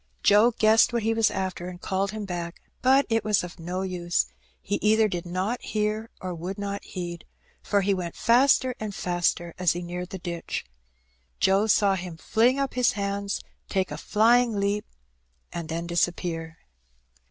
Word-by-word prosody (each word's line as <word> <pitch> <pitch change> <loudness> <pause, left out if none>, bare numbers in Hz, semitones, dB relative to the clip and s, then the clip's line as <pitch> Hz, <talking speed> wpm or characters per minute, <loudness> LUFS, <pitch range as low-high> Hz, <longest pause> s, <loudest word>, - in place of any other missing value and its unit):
Joe 210 +4 +6
guessed 220 +2 +5
what 235 -2 -1
he 225 +1 +2
was 225 -1 +3
after, 185 -2 -3
and 180 -1 -9
called 190 +2 -1
him 215 0 -5
back; 175 -2 -5 0.2
but 265 +2 +5
it 225 -2 +1
was 210 -3 +2
of 180 0 -9
no 180 +3 -3
use, 175 -2 0 0.3
he 205 - -2
either 215 +1 +4
did 175 -3 -4
not 190 +7 -2
hear 215 +1 -2
or 185 -1 -4
would 175 +3 -5
not 200 0 -4
heed, 175 -2 -6 0.4
for 200 -1 +1
he 200 +1 +2
went 175 -3 -4
faster 255 +1 +4
and 210 -2 -5
faster 175 -1 0
as 180 -2 +3
he 175 +1 -5
neared 180 +1 -5
the 190 - -5
ditch. 170 -2 -4 0.7
Joe 195 +3 +3
saw 205 -2 +4
him 180 -3 -5
fling 235 +9 +2
up 275 -1 -1
his 250 -1 +3
hands, 200 0 -2 0.3
take 190 -1 0
a - - -3
flying 230 0 +3
leap, 200 +1 0 0.7
and 170 -2 -5
then 165 +1 -3
disappear. 170 -1 -1
195 Hz, 175 wpm, -26 LUFS, 175-215 Hz, 0.7 s, Joe